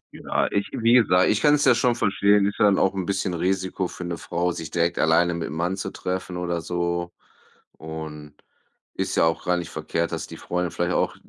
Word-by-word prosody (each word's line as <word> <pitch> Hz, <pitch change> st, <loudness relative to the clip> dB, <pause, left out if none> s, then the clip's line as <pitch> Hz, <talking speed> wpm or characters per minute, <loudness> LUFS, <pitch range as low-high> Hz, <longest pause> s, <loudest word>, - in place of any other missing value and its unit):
Ja, -, -, -1 dB
ich 100 Hz, -, 0 dB
wie 115 Hz, +1 st, +2 dB
gesagt, 95 Hz, -7 st, +5 dB
ich 105 Hz, -, +2 dB
kann's 150 Hz, -1 st, +4 dB
ja -, -, +7 dB
schon 125 Hz, -2 st, +2 dB
verstehen, 100 Hz, -1 st, +3 dB
ist 100 Hz, -, -2 dB
ja -, -, +5 dB
dann 100 Hz, -2 st, +4 dB
auch 95 Hz, -, +2 dB
'n 95 Hz, -1 st, -3 dB
bisschen 95 Hz, -2 st, -1 dB
Risiko 95 Hz, +1 st, -1 dB
für 90 Hz, -, -8 dB
'ne 85 Hz, -1 st, -4 dB
Frau, 90 Hz, +1 st, -1 dB
sich 80 Hz, -3 st, -6 dB
direkt 85 Hz, 0 st, 0 dB
alleine 85 Hz, +2 st, +3 dB
mit 85 Hz, -1 st, -3 dB
'nem 80 Hz, -, -6 dB
Mann 85 Hz, +3 st, 0 dB
zu 95 Hz, 0 st, -4 dB
treffen 90 Hz, -1 st, -4 dB
oder 85 Hz, -1 st, -2 dB
so. 85 Hz, +1 st, -2 dB, 0.6 s
Und 80 Hz, -2 st, -8 dB, 0.6 s
ist -, -, -2 dB
ja -, -, +4 dB
auch 80 Hz, 0 st, 0 dB
gar 90 Hz, 0 st, +1 dB
nicht 85 Hz, -, -5 dB
verkehrt, 85 Hz, +2 st, -2 dB
dass 80 Hz, -, -3 dB
die -, -, -10 dB
Freunde 90 Hz, -1 st, -2 dB
vielleicht 85 Hz, +1 st, -1 dB
auch -, -, 0 dB
90 Hz, 220 wpm, -24 LUFS, 85-95 Hz, 0.6 s, ja